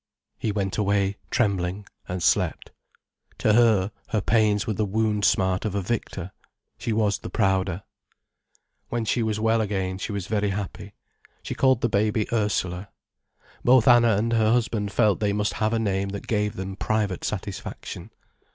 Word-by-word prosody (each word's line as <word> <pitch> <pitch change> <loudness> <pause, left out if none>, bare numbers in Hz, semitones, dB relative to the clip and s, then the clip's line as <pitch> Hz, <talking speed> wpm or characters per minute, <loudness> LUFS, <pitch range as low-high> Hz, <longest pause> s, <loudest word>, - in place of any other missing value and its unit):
He 110 - -1
went 100 -1 -2
away, 100 -1 +1
trembling, 100 -3 0 0.2
and 90 -1 -3
slept. - - +1 0.7
To 110 - +2
her, 110 -4 +4 0.2
her 110 - 0
pains 105 +1 +2
were 110 - -1
the 110 - -1
wound 105 0 0
smart 95 -1 +2
of 105 -2 -2
a 100 - 0
victor, 95 -3 -3 0.5
she 115 - -2
was 105 -2 +1
the - - -7
prouder. 95 -3 0 1.1
When 120 -1 -2
she 120 - +1
was 110 -1 -1
well 110 +1 +2
again 95 -3 -2
she 100 - -4
was 100 -3 -3
very 105 0 0
happy. 100 -1 -5 0.5
She - - -4
called 130 -3 +3
the - - +2
baby 105 0 +1
Ursula. 100 -3 -1 0.7
Both 125 -2 +5
Anna 120 -4 +6
and 115 +3 0
her 110 -1 +3
husband 110 -4 0
felt 105 -4 +2
they 105 -2 +1
must 105 +1 0
have 110 0 0
a 115 - +1
name 100 -3 -1
that 100 0 -6
gave 105 -1 -1
them 95 -1 -5
private 105 -5 -1
satisfaction. 100 -1 -5
105 Hz, 165 wpm, -25 LUFS, 100-110 Hz, 1.1 s, Anna